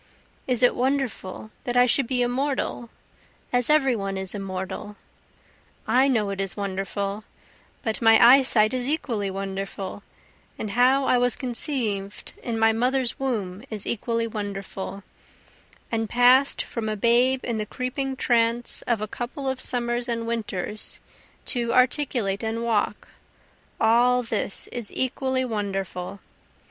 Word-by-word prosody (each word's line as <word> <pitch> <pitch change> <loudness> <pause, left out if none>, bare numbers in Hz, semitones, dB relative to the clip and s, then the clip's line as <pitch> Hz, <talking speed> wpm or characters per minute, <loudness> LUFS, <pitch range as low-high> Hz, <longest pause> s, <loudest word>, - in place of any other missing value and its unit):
Is 250 -1 +2
it 245 - +6
wonderful 250 -6 -2
that 245 0 -1
I 245 - +7
should 250 +1 +3
be 250 -1 +1
immortal? 250 -1 -2 0.6
as 245 +1 +3
every 275 -5 +4
one 195 -2 -3
is 190 -1 -4
immortal; 195 +1 -5 0.9
I 255 +5 +4
know 220 -7 +1
it 195 0 -3
is 195 +1 -2
wonderful, 200 +1 -3 0.6
but 220 +1 -2
my 225 -1 +6
eyesight 240 -3 +6
is 255 +1 -1
equally 235 -10 -1
wonderful, 195 0 -5 0.6
and 210 - -4
how 255 +4 +4
I 250 - +3
was 245 -1 +2
conceived 230 -6 -3
in 235 -2 -3
my 225 0 +4
mother's 250 +1 +1
womb 215 -7 -2
is 210 -3 -1
equally 230 +1 -1
wonderful, 200 -2 -5 0.9
And 225 -2 -1
pass'd 250 +3 +5
from 225 -2 -4
a 215 - -1
babe 245 +4 +3
in 235 -2 -2
the 215 -1 -3
creeping 265 +3 -3
trance 235 -1 +1
of 230 -3 +1
a - - -3
couple 255 +5 -5
of 265 -1 -2
summers 240 0 0
and 230 -1 -2
winters 215 -3 -4 0.5
to 240 -3 0
articulate 250 -6 +1
and 225 +1 -2
walk 215 -2 0 0.7
all 245 +2 +4
this 220 -3 -2
is 240 -4 -3
equally 260 0 0
wonderful. 195 -4 -4
230 Hz, 135 wpm, -25 LUFS, 205-250 Hz, 0.9 s, I